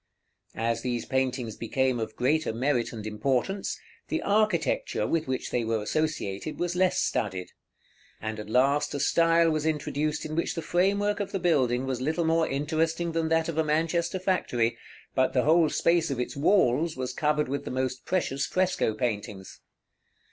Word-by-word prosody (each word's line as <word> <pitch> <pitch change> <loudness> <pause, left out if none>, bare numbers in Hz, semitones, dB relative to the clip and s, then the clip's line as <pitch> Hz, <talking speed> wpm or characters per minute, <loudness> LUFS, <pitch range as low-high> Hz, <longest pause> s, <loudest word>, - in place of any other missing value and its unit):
As 115 0 -1
these 120 -2 -2
paintings 125 -4 -1
became 130 +1 0
of 110 -1 -4
greater 155 +4 +1
merit 120 +1 0
and 110 -3 -7
importance, 130 - -1 0.3
the 320 - -2
architecture 200 - +1
with 165 +2 0
which 130 -1 -3
they 120 - 0
were 115 0 0
associated 155 -3 -2
was 175 0 -2
less 185 0 +2
studied; 95 -4 -1 0.7
and 110 0 -4
at 105 - -7
last 140 +5 +2
a - - -2
style 165 +2 +4
was 155 -1 -1
introduced 150 -1 -1
in 155 0 -4
which 170 - -1
the 165 - -4
framework 200 +4 +1
of 205 - -3
the - - -1
building 130 -8 +2
was 130 -2 -2
little 160 +5 0
more 165 0 +2
interesting 160 +4 0
than 165 -1 -1
that 165 -1 +2
of 165 -1 -2
a - - +4
Manchester 165 +3 0
factory, 150 -11 0 0.4
but 130 -1 +2
the 125 - +3
whole 160 +1 +4
space 170 +1 +2
of 135 -3 -2
its 125 - -3
walls 155 -1 +2
was 130 0 -3
covered 150 +1 +1
with 140 +1 -3
the - - -6
most 130 0 -2
precious 140 -7 -1
fresco 185 -11 +1
paintings. 105 -4 -4
145 Hz, 170 wpm, -27 LUFS, 125-165 Hz, 0.7 s, style